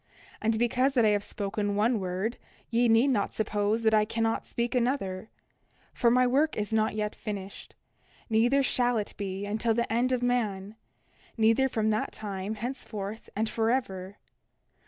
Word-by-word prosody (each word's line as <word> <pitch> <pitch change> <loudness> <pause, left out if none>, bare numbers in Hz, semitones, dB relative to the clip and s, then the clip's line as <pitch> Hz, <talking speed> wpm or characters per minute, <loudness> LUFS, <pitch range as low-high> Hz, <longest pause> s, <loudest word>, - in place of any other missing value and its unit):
And 220 0 +1
because 255 +4 +1
that 240 -3 +4
I - - +5
have 205 -1 +2
spoken 205 0 -2
one 220 +2 +2
word 190 +5 -3 0.3
ye 235 +1 +3
need 225 +5 +5
not 215 -7 0
suppose 210 +1 0
that 220 0 +3
I 215 -1 +5
cannot 225 +1 -1
speak 235 +1 -2
another; 235 -6 -1 0.6
for 240 - +3
my 250 +2 +4
work 285 +5 +2
is 210 0 -2
not 215 -1 +1
yet 210 0 -2
finished; 200 -2 -7 0.5
neither 240 +5 +3
shall 245 -2 +2
it 210 - -3
be 195 0 -4
until 220 +2 0
the 235 -1 -1
end 245 +2 +2
of 250 -1 0
man, 215 -5 -1 0.6
neither 225 +4 +3
from 220 -3 0
that 215 - -1
time 200 0 -5
henceforth 220 -3 -5
and 220 +2 0
forever. 215 -5 -1
220 Hz, 160 wpm, -28 LUFS, 205-240 Hz, 0.6 s, I